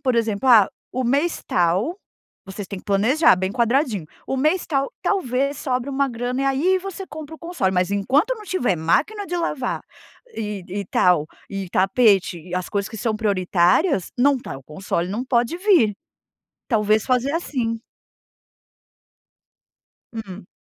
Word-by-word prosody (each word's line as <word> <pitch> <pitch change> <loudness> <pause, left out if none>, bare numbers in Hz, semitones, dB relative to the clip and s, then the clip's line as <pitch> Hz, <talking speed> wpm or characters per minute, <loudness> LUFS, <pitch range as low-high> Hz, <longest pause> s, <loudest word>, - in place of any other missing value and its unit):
por 260 -3 +1
exemplo. 230 +1 0
"Ah, 220 -5 +7 0.2
o 255 - -1
mês, 285 +8 +1
tal", 185 - +1 0.5
vocês 195 +1 -7
têm 195 - -5
que - - -16
planejar 225 - +4
bem 190 +1 -1
quadradinho, 235 - +1 0.2
"O 265 - -2
mês, 310 +7 +1
tal, 275 -3 +1
talvez 275 -6 0
sobre 255 0 -2
uma 275 0 +1
grana, 245 +2 -2
e - - 0
aí, 300 +8 +2
você 385 0 -6
compra 310 +1 -8
o - - -13
console. 335 - -1
Mas 180 +1 +1
enquanto 270 - +2
não 425 - -11
tiver 250 - 0
máquina 310 - 0
de 355 - -3
lavar 300 -7 -2 0.5
e 210 -3 -4
e 200 +2 -4
tal, 180 -5 +3 0.2
e 195 -2 -4
tapete 195 -2 +3
e 175 +2 -8
as 185 -1 -2
coisas 200 -1 -2
que 220 - -9
são 215 0 -1
prioritárias, 190 - +2
não 280 +1 +4
tá 240 - -7
o - - -17
console 170 +3 -3
não 225 +6 -3
pode 250 +5 +1
vir". 355 - +4 0.7
Talvez 215 -2 +2
fazer 255 +2 +1
assim. 250 -9 -2 2.4
Hum? 195 -4 -8
235 Hz, 155 wpm, -22 LUFS, 195-285 Hz, 2.4 s, Ah